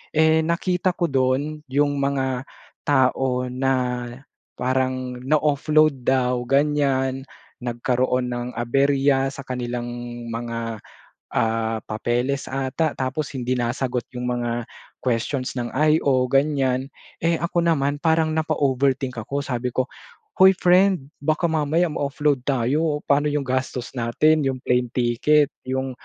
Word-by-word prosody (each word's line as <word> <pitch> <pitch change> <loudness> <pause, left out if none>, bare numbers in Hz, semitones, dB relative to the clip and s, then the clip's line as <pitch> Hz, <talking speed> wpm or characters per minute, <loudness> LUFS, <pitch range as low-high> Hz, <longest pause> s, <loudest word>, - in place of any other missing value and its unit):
Eh, 160 0 +5
nakita 180 +2 0
ko 170 - 0
dun 135 +4 0
yung 145 +1 +1
mga 135 -2 -1 0.4
tao 130 -2 +2
na 135 +1 +1 0.8
parang 130 0 -1
na-offload 150 -1 +2
daw 125 -2 +2
ganyan. 135 -2 +1 0.3
Nagkaroon 125 +1 0
ng 120 0 -3
aberya 135 +3 +2
sa 140 - -7
kanilang 120 -1 -4 0.4
mga, 115 -1 -4 0.5
ah, 110 0 0
papeles 120 +5 -1
ata 135 +4 -1
tapos 135 +3 -2
hindi 130 -1 -1
nasagot 125 0 -1
'yong 125 0 -4
mga 120 -1 -1 0.5
questions 125 +2 -1
ng 120 -1 -3
IO 140 -3 +3
ganyan. 135 -1 +1 0.3
Eh 165 0 +2
ako 170 0 0
naman 145 -4 +1
parang 160 -1 +3
napa-overthink 135 -4 0
ako 130 +6 -3
sabi 125 -2 -3
ko 130 +2 0 0.5
"Hoy 190 0 +8
friend! 180 -5 +3
Baka 155 +3 +1
mamaya 160 +3 +2
ma 150 - -3
offload 145 -1 0
tayo 145 +4 +1
paano 145 +1 +3
'yong 145 -1 0
gastos 130 -1 -2
natin, 130 +6 +2
'yong 130 -1 -1
plane 125 0 +1
ticket, 135 +5 +2 0.2
'yong 130 0 -2
135 Hz, 120 wpm, -23 LUFS, 125-150 Hz, 0.8 s, Hoy